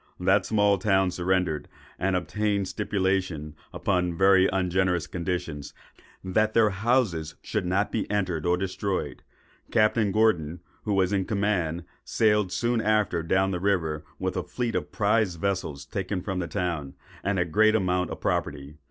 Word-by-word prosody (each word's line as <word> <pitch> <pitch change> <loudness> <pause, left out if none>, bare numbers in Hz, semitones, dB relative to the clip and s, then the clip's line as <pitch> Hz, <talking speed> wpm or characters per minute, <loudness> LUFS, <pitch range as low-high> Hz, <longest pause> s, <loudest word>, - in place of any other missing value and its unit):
That 95 +2 +2
small 105 -2 +3
town 95 -2 +2
surrendered, 90 -3 0 0.3
and 95 0 +1
obtained 100 +3 0
a - - -6
stipulation, 95 -6 -1 0.2
upon 90 -3 -1
very 95 0 +5
ungenerous 90 -1 +1
conditions, 85 -5 -4 0.5
that 110 +4 +1
their 110 -2 +5
houses 95 -7 0
should 105 -5 -2
not 95 +3 +1
be 110 - -2
entered 95 -6 -1
or 90 0 +3
destroyed. 95 +1 -3 0.5
Captain 110 -1 +2
Gordon, 90 -7 +2 0.3
who 105 -2 0
was 95 0 +2
in 95 -2 +1
command, 95 -6 -1 0.2
sailed 105 -4 +2
soon 120 +1 0
after 105 -5 +1
down 95 +3 +1
the 90 - -2
river 85 -6 0
with 95 0 -2
a 90 - 0
fleet 120 +4 -3
of - - -3
prize 105 -3 +1
vessels 85 -6 -3
taken 95 +4 -3
from 95 -2 -3
the 85 - -2
town, 85 -8 -3 0.3
and 100 0 0
a 90 - +2
great 110 +6 +3
amount 90 -4 +1
of - - -6
property. 70 +1 -2
95 Hz, 155 wpm, -26 LUFS, 90-105 Hz, 0.5 s, very